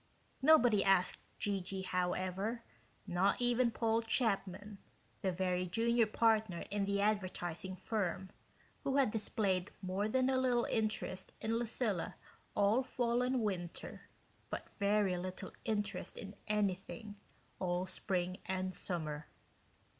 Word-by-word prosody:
Nobody 250 Hz, -8 st, +6 dB
asked 195 Hz, -2 st, +3 dB, 0.2 s
G.G. 195 Hz, -1 st, -2 dB
however 185 Hz, +5 st, -1 dB, 0.4 s
not 190 Hz, +1 st, +2 dB
even 245 Hz, 0 st, +3 dB
Paul 225 Hz, 0 st, +1 dB
Chapman, 205 Hz, -3 st, 0 dB, 0.4 s
the 190 Hz, -, +1 dB
very 180 Hz, 0 st, 0 dB
junior 230 Hz, +4 st, +3 dB
partner 220 Hz, -5 st, +2 dB
in 205 Hz, -1 st, +1 dB
the 200 Hz, 0 st, 0 dB
advertising 190 Hz, -2 st, -1 dB
firm, 190 Hz, -2 st, -2 dB, 0.5 s
who 270 Hz, -, 0 dB
had 265 Hz, -6 st, +4 dB
displayed 200 Hz, -4 st, 0 dB
more 195 Hz, +2 st, -1 dB
than 255 Hz, +2 st, +3 dB
a 260 Hz, -1 st, +3 dB
little 245 Hz, -2 st, +3 dB
interest 215 Hz, -4 st, -1 dB
in 225 Hz, +1 st, 0 dB
Lucilla 230 Hz, -5 st, -1 dB, 0.4 s
all 205 Hz, +5 st, +4 dB
fall 245 Hz, -2 st, 0 dB
and 250 Hz, 0 st, +1 dB
winter, 180 Hz, -5 st, -4 dB, 0.4 s
but -, -, -5 dB
very 200 Hz, -2 st, +3 dB
little 185 Hz, +1 st, -5 dB
interest 205 Hz, -4 st, -2 dB
in 200 Hz, 0 st, -7 dB
anything 205 Hz, 0 st, -1 dB, 0.4 s
all 180 Hz, 0 st, 0 dB
spring 185 Hz, 0 st, -1 dB
and 185 Hz, 0 st, -1 dB
summer. 155 Hz, -5 st, -3 dB
200 Hz, 120 wpm, -35 LUFS, 185-225 Hz, 0.5 s, Nobody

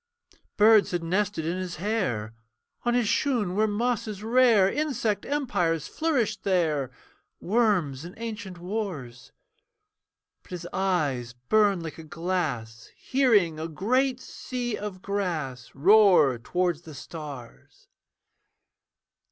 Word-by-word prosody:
Birds 215 Hz, 0 st, +6 dB
had 175 Hz, -2 st, -2 dB
nested 190 Hz, 0 st, -1 dB
in 170 Hz, +3 st, -1 dB
his 185 Hz, -2 st, -4 dB
hair, 155 Hz, -, -2 dB, 0.5 s
On 240 Hz, 0 st, +2 dB
his 245 Hz, -3 st, +2 dB
shoon 225 Hz, -7 st, +1 dB
were 215 Hz, +3 st, +2 dB
mosses 215 Hz, -1 st, -2 dB
rare. 230 Hz, -4 st, +5 dB
Insect 230 Hz, -6 st, -1 dB
empires 190 Hz, -, 0 dB
flourished 250 Hz, -10 st, -1 dB
there, 160 Hz, -8 st, +1 dB, 0.5 s
Worms 185 Hz, -, +1 dB
in 175 Hz, +2 st, -9 dB
ancient 215 Hz, -5 st, -6 dB
wars; 175 Hz, -, -5 dB, 1.1 s
But -, -, -24 dB
his 180 Hz, -2 st, -6 dB
eyes 145 Hz, -11 st, 0 dB
burn 195 Hz, -, +2 dB
like 165 Hz, 0 st, -7 dB
a -, -, -8 dB
glass, 150 Hz, -10 st, -3 dB
Hearing 210 Hz, -, +2 dB
a 160 Hz, -, -3 dB
great 250 Hz, -, 0 dB
sea 250 Hz, -2 st, -5 dB
of 200 Hz, -3 st, -7 dB
grass 160 Hz, -11 st, -3 dB
Roar 180 Hz, -, +5 dB
towards 175 Hz, +5 st, -1 dB
the 160 Hz, -3 st, -11 dB
stars. 140 Hz, -3 st, -10 dB
185 Hz, 115 wpm, -26 LUFS, 155-220 Hz, 1.1 s, Birds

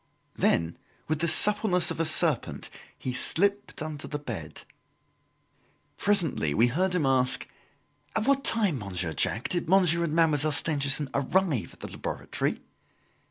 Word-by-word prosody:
Then, 85 Hz, 0 st, 0 dB, 0.3 s
with 155 Hz, 0 st, -2 dB
the 170 Hz, -, 0 dB
suppleness 195 Hz, 0 st, +4 dB
of -, -, -6 dB
a 165 Hz, -, +1 dB
serpent, 155 Hz, -2 st, +1 dB, 0.3 s
he 130 Hz, -, -5 dB
slipped 200 Hz, +7 st, 0 dB
under 155 Hz, -2 st, -7 dB
the 145 Hz, -, -4 dB
bed. 110 Hz, -, -8 dB, 1.3 s
Presently 165 Hz, -, 0 dB
we 120 Hz, +3 st, +3 dB
heard 180 Hz, +7 st, -1 dB
him 165 Hz, -5 st, 0 dB
ask: 130 Hz, -1 st, +2 dB, 0.7 s
"At 220 Hz, -, 0 dB
what 275 Hz, 0 st, +2 dB
time, 205 Hz, -, +2 dB
Monsieur 90 Hz, -5 st, -3 dB
Jacques, 110 Hz, +8 st, 0 dB
did 175 Hz, -2 st, -2 dB
Monsieur 175 Hz, -3 st, +3 dB
and 160 Hz, -3 st, -2 dB
Mademoiselle 155 Hz, -2 st, +2 dB
Stangerson 140 Hz, -2 st, +1 dB
arrive 140 Hz, -, -1 dB
at -, -, -17 dB
the -, -, -7 dB
laboratory?" -, -, -4 dB
155 Hz, 140 wpm, -26 LUFS, 130-180 Hz, 1.3 s, suppleness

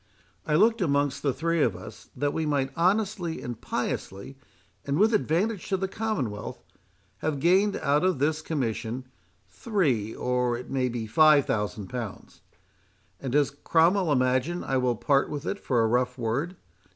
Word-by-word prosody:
I 150 Hz, -, +2 dB
looked, 220 Hz, +6 st, +4 dB
amongst 145 Hz, -4 st, +1 dB
the 140 Hz, -, +1 dB
three 165 Hz, +5 st, 0 dB
of 115 Hz, -9 st, +2 dB
us, -, -, -11 dB
that 145 Hz, 0 st, -1 dB
we 160 Hz, -, -1 dB
might 140 Hz, -2 st, 0 dB
honestly, 185 Hz, -1 st, 0 dB
and 120 Hz, -2 st, -6 dB
piously, 100 Hz, +8 st, -4 dB, 0.5 s
and 140 Hz, +1 st, -1 dB
with 220 Hz, +5 st, +4 dB
advantage 200 Hz, +2 st, 0 dB
to 190 Hz, -, +1 dB
the 190 Hz, +1 st, -2 dB
Commonwealth, 170 Hz, -, -4 dB, 0.6 s
have 155 Hz, -3 st, -2 dB
gained 190 Hz, +6 st, +3 dB
out 145 Hz, +3 st, +1 dB
of 185 Hz, -4 st, +2 dB
this 155 Hz, +3 st, 0 dB
commission 130 Hz, -4 st, -3 dB, 0.4 s
three, 140 Hz, -, -1 dB
or 125 Hz, -1 st, 0 dB
it 125 Hz, -, -9 dB
may 130 Hz, -2 st, 0 dB
be 120 Hz, -2 st, -4 dB
five 150 Hz, +5 st, +5 dB
thousand 105 Hz, -2 st, -2 dB
pounds. 120 Hz, -5 st, -7 dB, 0.8 s
And 135 Hz, -, -4 dB
does 145 Hz, -1 st, +3 dB
Cromwell 165 Hz, +5 st, +2 dB
imagine 130 Hz, +6 st, +1 dB
I 135 Hz, -, 0 dB
will 125 Hz, -1 st, +1 dB
part 140 Hz, +5 st, +2 dB
with 150 Hz, +1 st, -5 dB
it 200 Hz, -, -3 dB
for 120 Hz, -4 st, +1 dB
a -, -, +3 dB
rough 125 Hz, +3 st, 0 dB
word? 130 Hz, +10 st, -2 dB
145 Hz, 165 wpm, -27 LUFS, 125-175 Hz, 0.8 s, five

